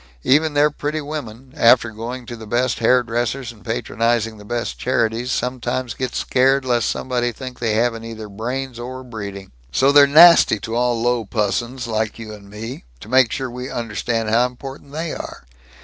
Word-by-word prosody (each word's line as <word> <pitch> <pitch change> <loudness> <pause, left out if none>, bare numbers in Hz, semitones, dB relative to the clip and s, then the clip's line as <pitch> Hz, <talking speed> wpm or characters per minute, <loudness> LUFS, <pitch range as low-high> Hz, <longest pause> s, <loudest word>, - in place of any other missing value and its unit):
Even 150 +2 +3
their 150 +1 +4
pretty 150 +2 -3
women, 135 -4 -7
after 120 -4 +5
going 120 +3 -6
to 120 0 -7
the 110 -1 -10
best 120 +2 0
hair 125 +2 +4
dressers 120 +2 -2
and 110 -3 -18
patronizing 115 -1 -1
the - - -11
best 120 +3 -4
charities, 120 0 0
sometimes 125 -1 -2
get 130 -1 -4
scared 135 +1 +2
lest 120 -3 +1
somebody 120 -2 -1
think 130 +2 -9
they 115 -3 0
haven't 115 0 0
either 110 -1 -7
brains 120 +4 -5
or 130 +2 -6
breeding. 100 -5 -8 0.2
"So 135 - +3
they're 145 0 +7
nasty 165 -5 +7
to 110 - -5
all 120 0 +1
low 120 0 +1
pussons 120 +4 -2
like 110 -2 -2
you 110 -2 -8
and 100 -1 -13
me, 110 +5 -7 0.2
to 105 - -12
make 130 -2 +4
sure 135 -2 -2
we 125 +2 -6
understand 115 0 -2
how 120 +2 +4
important 135 +3 -10
they 160 +2 -4
are. - - -8
120 Hz, 180 wpm, -20 LUFS, 115-130 Hz, 0.2 s, they're